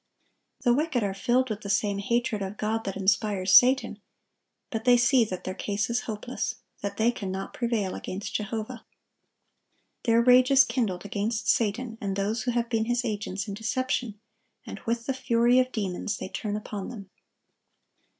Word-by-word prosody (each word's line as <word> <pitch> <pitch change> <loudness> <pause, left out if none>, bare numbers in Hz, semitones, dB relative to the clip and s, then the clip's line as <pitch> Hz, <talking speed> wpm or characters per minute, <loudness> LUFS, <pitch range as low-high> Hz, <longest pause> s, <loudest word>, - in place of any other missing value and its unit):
The 240 - +3
wicked 285 -3 0
are 200 -1 -1
filled 245 +4 +1
with 215 0 -4
the 200 - -7
same 200 0 +1
hatred 230 0 0
of 195 +1 -5
God 220 +1 -2
that 195 -1 -3
inspires 195 -1 +1
Satan; 260 +2 +5 0.7
but 225 -1 -3
they 245 0 +6
see 245 0 +4
that 185 -4 -6
their 185 - -4
case 205 +3 -2
is 235 - -1
hopeless, 220 +4 -3 0.3
that 200 0 -4
they 225 +2 +3
cannot 195 -4 -5
prevail 230 -6 -1
against 195 +2 -6
Jehovah. 220 +3 -4 1.2
Their 230 -1 +4
rage 250 +1 +6
is 275 0 +7
kindled 225 -8 -2
against 215 +3 -2
Satan 225 +1 0
and 195 -2 -2
those 205 +3 -1
who 245 - -2
have 235 -1 0
been 225 -2 0
his 240 +1 0
agents 205 -2 -3
in 200 - -4
deception, 225 0 -2 0.5
and - - -7
with 230 0 -1
the 270 - 0
fury 245 -1 +3
of 255 0 +1
demons 205 -1 -3
they - - -6
turn 210 +1 -3
upon 210 -2 -5
them. 200 -6 -9
220 Hz, 170 wpm, -27 LUFS, 200-245 Hz, 1.2 s, is